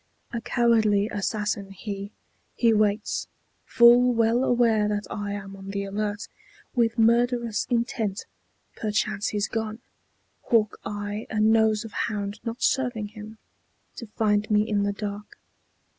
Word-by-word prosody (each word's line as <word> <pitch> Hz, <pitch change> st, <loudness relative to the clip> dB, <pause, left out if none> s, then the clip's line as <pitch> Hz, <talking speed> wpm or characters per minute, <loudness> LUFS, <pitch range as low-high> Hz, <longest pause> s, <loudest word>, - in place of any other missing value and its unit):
A 235 Hz, -, -2 dB
cowardly 220 Hz, -4 st, +2 dB
assassin 205 Hz, -1 st, -2 dB
he; 200 Hz, 0 st, -6 dB, 0.4 s
he 230 Hz, -2 st, +3 dB
waits, 210 Hz, 0 st, 0 dB, 0.4 s
Full 240 Hz, +1 st, +6 dB
well 230 Hz, +2 st, +2 dB
aware 230 Hz, -4 st, +3 dB
that 210 Hz, 0 st, -2 dB
I 205 Hz, -1 st, -3 dB
am 195 Hz, -1 st, -7 dB
on 195 Hz, 0 st, -11 dB
the 200 Hz, 0 st, -3 dB
alert, 205 Hz, +1 st, -3 dB, 0.5 s
With 235 Hz, -2 st, +1 dB
murderous 235 Hz, -1 st, +2 dB
intent. 230 Hz, -4 st, -1 dB, 0.5 s
Perchance 210 Hz, -1 st, -1 dB
he's 210 Hz, 0 st, -1 dB
gone, 220 Hz, -1 st, -3 dB, 0.7 s
Hawk 215 Hz, -3 st, +2 dB
eye 205 Hz, +1 st, -5 dB
and 215 Hz, 0 st, +3 dB
nose 220 Hz, -1 st, +2 dB
of 225 Hz, -, -9 dB
hound 205 Hz, -2 st, -3 dB
not 230 Hz, +1 st, -5 dB
serving 245 Hz, -6 st, 0 dB
him 215 Hz, +1 st, -11 dB, 0.6 s
To 235 Hz, -, -7 dB
find 210 Hz, 0 st, 0 dB
me 210 Hz, 0 st, +3 dB
in 210 Hz, -2 st, +1 dB
the 200 Hz, 0 st, +1 dB
dark. 205 Hz, 0 st, -6 dB
215 Hz, 135 wpm, -25 LUFS, 205-230 Hz, 0.7 s, Full